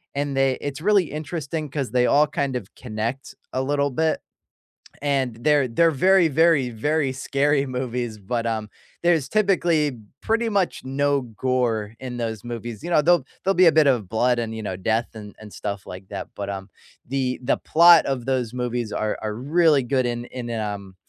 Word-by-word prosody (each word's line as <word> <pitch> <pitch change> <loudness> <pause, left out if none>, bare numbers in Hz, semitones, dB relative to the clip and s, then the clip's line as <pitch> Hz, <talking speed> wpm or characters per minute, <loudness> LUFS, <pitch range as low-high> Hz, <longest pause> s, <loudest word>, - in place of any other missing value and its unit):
and 140 -1 -2
they 135 -1 +2
It's 145 +1 -5
really 200 -1 +4
interesting 155 0 -4
'cause 140 -5 -3
they 125 -1 +3
all 145 +4 +4
kind 140 -2 -2
of 110 -6 -6
connect 115 +3 -5 0.2
a 130 - -1
little 140 +1 +1
bit. 160 +4 0 0.8
And 135 -5 0
they're 145 -3 +3
they're 165 +8 +3
very, 185 +4 +4
very, 160 -3 +3
very 140 +4 0
scary 140 +2 +1
movies, 125 -3 -3
but, 115 +4 -3
um, 110 -2 -2 0.3
there's 165 -6 +2
typically 170 - +2 0.2
pretty 230 +1 0
much 195 -8 0
no 140 +1 +1
gore 115 -2 -1
in 125 -2 -6
those 110 -3 -4
movies, 120 -2 -6
you 175 - -4
know, 160 - +5
they'll 175 -2 +4 0.2
they'll 195 0 +2
be 185 - +5
a 165 - +7
bit 155 -1 +4
of 115 -8 +1
blood 120 +2 +2
and, 110 -1 -3
you 110 - -6
know, 95 -3 -4
death 110 +5 0
and 105 -2 -10
and 105 -1 -11
stuff 100 -1 -5
like 95 +1 -9
that, - - -6
but, 100 -1 -4
um. 95 0 -6 0.4
The 130 -1 -1
the 125 - +1
plot 170 0 +6
of 130 -2 -2
those 125 -4 -1
movies 120 -2 -3
are 110 0 -2
are 105 -1 -3
really 150 +3 +3
good 130 +1 0
in 120 0 -3
in 120 -2 -7
a 115 - -2 0.2
um, 100 -2 -10
130 Hz, 190 wpm, -23 LUFS, 115-150 Hz, 0.8 s, a